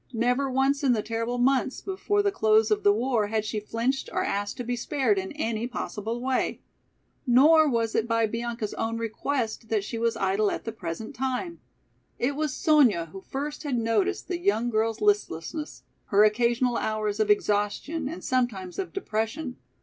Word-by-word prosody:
Never 250 +4 +1
once 270 +2 +1
in 260 -3 +4
the 215 -3 -1
terrible 230 +2 -2
months 260 +1 +2
before 410 +2 -1
the 405 - +2
close 220 - +3
of 215 - +2
the 205 - +5
war 225 0 +1
had 220 0 -1
she 215 0 -2
flinched 230 +5 -2
or - - 0
asked 205 +2 -2
to 245 - -3
be 245 +1 -2
spared 240 -4 +1
in 190 0 -5
any 235 -6 -2
possible 230 -2 -4
way. 255 +1 -1 0.7
Nor 300 +5 +6
was 230 -3 0
it 225 - +1
by 230 -1 +2
Bianca's 230 -1 -3
own 225 0 -2
request 230 0 -3
that 215 -3 +1
she 225 +3 -5
was 230 0 0
idle 195 +1 +1
at - - -4
the 225 - -4
present 195 0 -6
time. 265 +7 -3 0.6
It 270 +4 0
was 305 -1 -1
Sonya 255 - +3
who 195 - -9
first 290 +7 -5
had 285 -5 -1
noticed 235 - 0
the 355 -2 -2
young 240 - +1
girl's 220 0 0
listlessness, 315 - -1 0.2
her 205 +1 +4
occasional 235 +3 +2
hours 215 -1 -1
of 215 -1 +1
exhaustion 210 +9 0
and 335 - -7
sometimes 240 -9 -1
of 375 - -4
depression. 250 - -3
235 Hz, 180 wpm, -26 LUFS, 215-270 Hz, 0.7 s, Nor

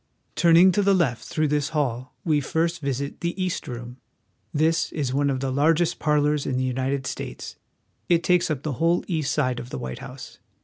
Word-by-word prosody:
Turning 170 +2 +6
to 205 - +1
the 200 0 +4
left 135 -10 0
through 155 -1 0
this 145 0 0
hall, 130 -3 -2
we 155 -3 +2
first 165 +4 -1
visit 140 0 -3
the 170 +3 -3
East 185 -2 -2
Room. 120 0 -7 0.5
This 160 +2 +1
is 140 -5 -2
one 140 +1 +2
of 130 -1 -1
the 135 -1 -1
largest 160 +5 +2
parlors 150 -1 +1
in 130 - -1
the 130 - 0
United 130 +1 -1
States. - - -6 0.5
It 170 -1 +3
takes 180 0 +3
up 145 -3 -2
the 155 - -2
whole 170 +1 +3
east 160 -6 -1
side 130 -5 0
of 120 0 -8
the - - -5
White 65 0 -6
House. - - -10
150 Hz, 200 wpm, -24 LUFS, 130-165 Hz, 0.5 s, Turning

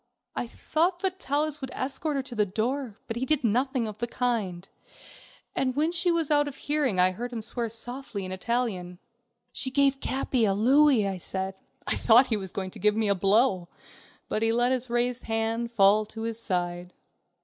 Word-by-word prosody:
I 245 - -2
thought 345 +8 -1
that 380 -1 -2
Vitalis 295 +2 -1
would 265 - -4
escort 280 +3 -2
her 270 - -1
to 260 - -9
the 215 -2 +2
door, 225 +4 -2
but 225 - -5
he 245 - -2
did 300 0 +1
nothing 245 +2 +1
of 215 -1 -8
the 235 - -1
kind, 215 -8 -2 0.9
and 255 -1 0
when 310 +3 +1
she 350 +1 +1
was 330 -3 +1
out 290 0 +4
of 285 - -6
hearing 290 -10 0
I 180 +1 +5
heard 240 +6 -5
him 230 -2 -4
swear 230 +1 -2
softly 230 -2 -4
in 185 - -6
Italian. 185 -3 -2 0.6
"She 265 - +1
gave 275 0 +2
Capi 260 -3 0
a 195 -3 +2
louis," 260 +1 +4
I 195 -1 -3
said. 190 +2 -3 0.3
I - - +2
thought 240 +3 +6
he 230 - 0
was 190 -3 -5
going 190 -2 -4
to - - -11
give 210 0 +3
me 220 -2 +1
a - - +5
blow, 195 -1 +2 0.6
but 215 - -2
he 225 0 +2
let 240 +2 +2
his 255 -1 -1
raised 240 +1 0
hand 225 +1 -1
fall 210 -1 +4
to 225 +1 -7
his 230 0 -4
side. 175 -3 -2
235 Hz, 200 wpm, -27 LUFS, 205-270 Hz, 0.9 s, thought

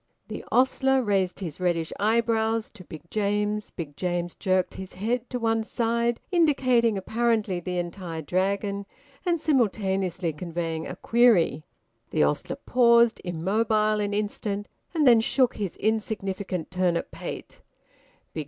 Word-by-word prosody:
The - - -6
ostler 265 +1 +3
raised 195 -3 0
his 165 -4 -5
reddish 170 -3 0
eyebrows 225 +1 +1
to 200 -5 -13
Big 160 -3 -10
James. 210 0 0
Big 150 -5 -7
James 175 0 -2
jerked 185 -1 0
his 190 -1 -8
head 235 +5 -2
to 250 - -2
one 225 -1 +1
side, 235 +1 0
indicating 255 - +3
apparently 220 -2 0
the 180 +1 -4
entire 175 -2 -4
Dragon, 200 +4 -1 0.4
and 340 -1 +2
simultaneously 195 - 0
conveying 165 0 -4
a - - -6
query. 215 - +3 0.4
The - - +2
ostler - - 0
paused 235 -2 +4
immobile 210 +5 +1
an 205 -1 -1
instant 205 -1 -2 0.3
and 310 -2 +3
then 235 -3 +7
shook 255 +2 +2
his 200 -4 -3
insignificant 200 -5 -2
turnip 180 -2 0
pate. - - -8
205 Hz, 130 wpm, -26 LUFS, 180-230 Hz, 0.4 s, then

